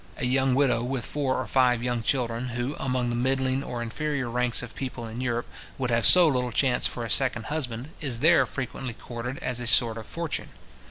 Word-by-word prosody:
A 140 - -2
young 130 0 +2
widow 130 -4 +2
with 125 0 -3
four 140 -3 -1
or 130 - -3
five 125 0 +2
young 120 -1 -1
children, 120 -1 -1
who, 125 +4 -2
among 125 -2 -1
the - - -1
middling 130 +2 0
or 120 -3 -4
inferior 135 +1 -3
ranks 125 0 0
of 120 - -7
people 130 -3 -5
in 115 +2 -6
Europe, 120 -1 -1 0.3
would 125 -2 -2
have 115 -2 +4
so 180 -2 +8
little 125 -4 0
chance 130 +1 +2
for 120 - -5
a - - -4
second 120 -3 +2
husband, 130 -3 -3
is 135 -6 0
there 160 +8 +4
frequently 130 -2 -5
courted 120 +2 -6
as 125 -2 -1
a 120 - -3
sort 115 -1 +5
of 110 - -10
fortune. 165 -2 -4
125 Hz, 210 wpm, -26 LUFS, 120-135 Hz, 0.3 s, so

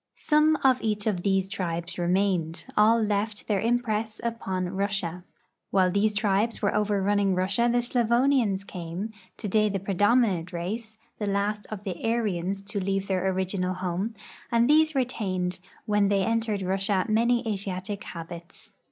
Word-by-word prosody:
Some 305 +1 +3
of 260 -1 +4
each 210 -2 -1
of 200 -5 0
these 195 0 +1
tribes 170 -2 -4
remained; 175 -2 0
all 220 +2 +5
left 210 -1 -1
their 205 -3 +1
impress 225 -2 0
U{)on 190 -6 -2
Russia. 195 -3 -1 0.5
While 185 -2 +3
these 205 +2 +1
tribes 210 +2 +1
were 205 - +1
overrunning 205 -1 +1
Russia 190 +6 +1
the 240 0 +2
Slavonians 240 -3 +2
came, 180 +4 -5 0.3
to - - -4
day 215 +1 +3
the 195 -1 -2
]>redominant 200 -2 +2
race, 220 +6 -4 0.2
the 210 - -2
last 205 +1 -1
of 210 -2 -6
the 185 -4 -5
Aryans 200 -4 -1
to 200 +1 -4
leave 195 0 -1
their 190 -1 0
original 185 0 -1
home, 185 +5 -3 0.4
ai\il 235 0 +4
these 310 +2 +4
retained 185 -8 -1 0.3
when 210 -1 +2
they 195 -1 +2
entered 225 -3 0
Russia 190 +1 +1
many 235 +2 +2
Asiatic 200 -1 -3
habits. 170 +1 -9
200 Hz, 150 wpm, -26 LUFS, 185-225 Hz, 0.5 s, all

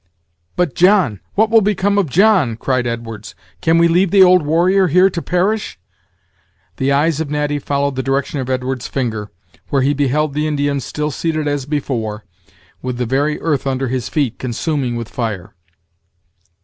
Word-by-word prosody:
"But 175 -6 0
John! 180 - +3 0.2
what 220 +2 +2
will 225 -1 +6
become 200 0 +1
of 185 -7 0
John?" 180 - +3
cried 130 0 -1
Edwards; 115 -2 -6 0.3
"can 165 0 +3
we 170 0 +5
leave 175 +3 +2
the 195 +1 +6
old 180 -1 +6
warrior 175 +5 +2
here 180 +4 +4
to 170 - -4
perish?" 195 +6 -1 1.0
The 135 +1 0
eyes 150 +2 +2
of 155 - -4
Natty 145 0 -1
followed 140 0 -1
the 130 - -1
direction 135 +2 -1
of 130 -1 -4
Edwards' 130 0 -2
finger, 110 -6 -3 0.4
where 135 -2 +1
he 140 +2 +2
beheld 145 +1 0
the 150 +2 -1
Indian 145 -2 0
still 150 +3 -3
seated 155 +1 -2
as 145 -2 -2
before, 115 -8 -3 0.6
with 125 -1 -4
the 125 - -1
very 140 +5 0
earth 145 -4 -1
under 135 -1 -1
his 130 -2 -3
feet 140 -7 -1
consuming 130 0 -2
with 115 -1 -4
fire. 110 -8 -5
145 Hz, 170 wpm, -17 LUFS, 130-170 Hz, 1.0 s, will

